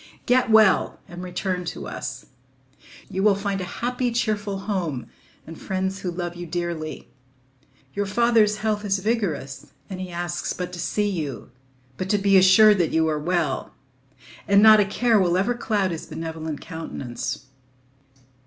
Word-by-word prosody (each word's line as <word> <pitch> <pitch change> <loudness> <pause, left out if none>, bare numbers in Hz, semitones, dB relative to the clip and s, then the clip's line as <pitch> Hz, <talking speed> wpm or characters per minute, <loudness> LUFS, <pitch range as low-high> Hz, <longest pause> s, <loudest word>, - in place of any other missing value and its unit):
"Get 250 -1 +3
well—and 195 -4 +3
return 180 0 -3
to - - -5
us. 130 0 -6 0.8
You 190 0 -3
will 205 0 +4
find 200 -1 -2
a 185 +6 -5
happy, 250 0 0
cheerful 210 -4 -1
home 175 - -2 0.4
and 165 0 -11
friends 190 0 -2
who 190 - -3
love 175 0 -4
you 175 0 -7
dearly. 165 -5 -4 0.8
Your 200 0 -2
father's 220 -1 +3
health 210 -1 0
is 200 -1 +1
vigorous, 190 - -2 0.2
and 185 -1 -5
he 185 - -5
asks 175 0 -3
but 180 0 -5
to 175 - -6
see 210 +4 0
you, 145 - -4 0.5
but 185 - -4
to 205 - +3
be 195 0 +3
assured 190 +2 +7
that 170 - +2
you 160 0 +2
are 155 -1 0
well; 170 +1 -1 0.7
and 200 +1 +5
not 215 -1 +9
a 205 - +4
care 225 +2 +2
will 180 -2 +2
ever 200 +6 +1
cloud 210 -5 0
his 165 - -6
benevolent 160 -2 -5
countenance. 135 -5 -6
190 Hz, 155 wpm, -24 LUFS, 170-210 Hz, 0.8 s, not